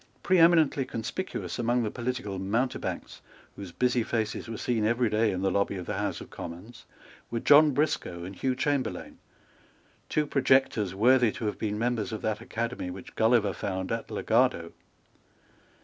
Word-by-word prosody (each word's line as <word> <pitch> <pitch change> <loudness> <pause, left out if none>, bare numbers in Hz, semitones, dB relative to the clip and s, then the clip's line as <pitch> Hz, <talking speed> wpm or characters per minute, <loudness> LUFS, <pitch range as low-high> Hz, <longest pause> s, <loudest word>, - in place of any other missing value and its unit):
Preeminently 165 -6 +4
conspicuous 125 +7 -5
among 120 +1 +1
the 105 - -2
political 120 -5 -4
mountebanks, 115 +7 -2 0.3
whose 95 -3 -8
busy 125 +7 +1
faces 110 0 -2
were 115 - -5
seen 115 -1 -1
every 115 +1 +1
day 110 +1 +2
in 95 0 -3
the 95 - +2
lobby 100 +1 0
of 90 - -6
the 105 - -3
House 105 - -2
of - - -11
Commons, 105 +8 -9 0.4
were 115 - -2
John 150 +5 +7
Briscoe 140 - -1
and 95 +2 -7
Hugh 130 +5 -1
Chamberlayne, 140 0 -2 0.9
two 150 - +1
projectors 130 -8 +2
worthy 120 +2 +4
to 115 - -5
have 105 - -3
been 105 -1 -2
members 115 -1 -1
of 110 - -5
that 110 0 -1
Academy 115 -4 -4
which 90 +1 -9
Gulliver 110 -3 +3
found 95 -1 -4
at - - -3
Lagado. - - +1
115 Hz, 160 wpm, -28 LUFS, 105-125 Hz, 0.9 s, John